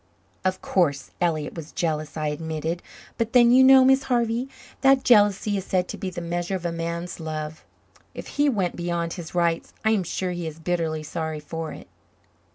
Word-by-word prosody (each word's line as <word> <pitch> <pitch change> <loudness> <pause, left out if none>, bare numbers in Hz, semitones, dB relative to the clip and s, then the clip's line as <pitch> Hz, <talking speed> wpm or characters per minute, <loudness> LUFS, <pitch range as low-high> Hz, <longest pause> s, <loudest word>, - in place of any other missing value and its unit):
"Of 185 0 -1
course 155 -7 +1
Elliott 155 -4 0
was 165 -2 -8
jealous," 155 -2 -2
I 155 -1 -1
admitted. 160 +2 -3 0.4
"But 230 +1 -1
then, 240 -1 +7
you 260 +1 +7
know, 265 0 +8
Miss 265 +1 +5
Harvey, 240 0 0 0.3
that 270 -1 +5
jealousy 205 -3 +4
is 190 - -4
said 185 -1 0
to - - -4
be 190 - -4
the 175 -1 -6
measure 175 +2 -2
of 180 -2 -5
a 170 - 0
man's 170 +1 -4
love. 155 -1 -5 0.5
If - - -7
he 290 0 +2
went 195 -8 0
beyond 170 -1 -2
his 175 -1 -8
rights 170 -1 0
I 220 - +4
am 215 -3 +2
sure 180 +1 -3
he 175 -2 -4
is 155 -1 -7
bitterly 165 -2 -2
sorry 160 0 -4
for 160 +2 -5
it." - - -10
175 Hz, 190 wpm, -24 LUFS, 160-205 Hz, 0.5 s, know